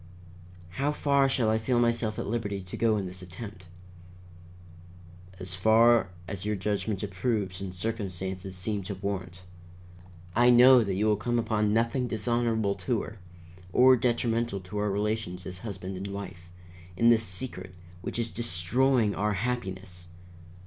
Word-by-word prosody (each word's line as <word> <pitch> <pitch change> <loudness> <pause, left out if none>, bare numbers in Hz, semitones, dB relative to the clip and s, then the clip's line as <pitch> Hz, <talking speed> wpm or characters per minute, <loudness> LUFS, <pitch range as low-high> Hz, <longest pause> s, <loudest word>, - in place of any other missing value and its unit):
"How 145 +2 +2
far 140 -2 +2
shall 120 -5 +2
I 110 - +2
feel 120 +2 +1
myself 115 -2 +1
at - - -3
liberty 100 -3 -3
to 90 - -8
go 110 -2 +2
in 100 - -2
this 90 0 -7
attempt?" 90 +1 -9 1.7
"As 90 -1 -5
far 110 +3 +4 0.2
as 95 -1 -5
your 105 +1 -1
judgment 105 +1 -2
approves 100 -1 -2
and 95 -1 -4
circumstances 95 -2 -4
seem 100 +2 -2
to 100 +1 -4
warrant. 95 -2 -5 0.9
I 120 +2 +5
know 125 0 +8
that 100 -3 -2
you 105 +3 +1
will 105 -1 +3
come 120 +3 -1
upon 110 -2 +1
nothing 115 +3 +1
dishonorable 115 -2 0 0.2
to 120 -3 +2
her, 110 -1 -10 0.5
or 130 +5 +7
detrimental 120 -3 0
to 95 +3 -6
our 105 0 0
relations 100 -3 -2
as 90 0 -6
husband 95 -2 -6
and 95 +2 -5
wife, 100 -3 -7 0.5
in 115 +3 +5
this 115 -1 +4
secret 90 -2 -6 0.3
which - - -5
is 115 -1 -1
destroying 115 +3 +1
our 105 +1 0
happiness. 95 -5 -4
105 Hz, 150 wpm, -28 LUFS, 95-115 Hz, 1.7 s, know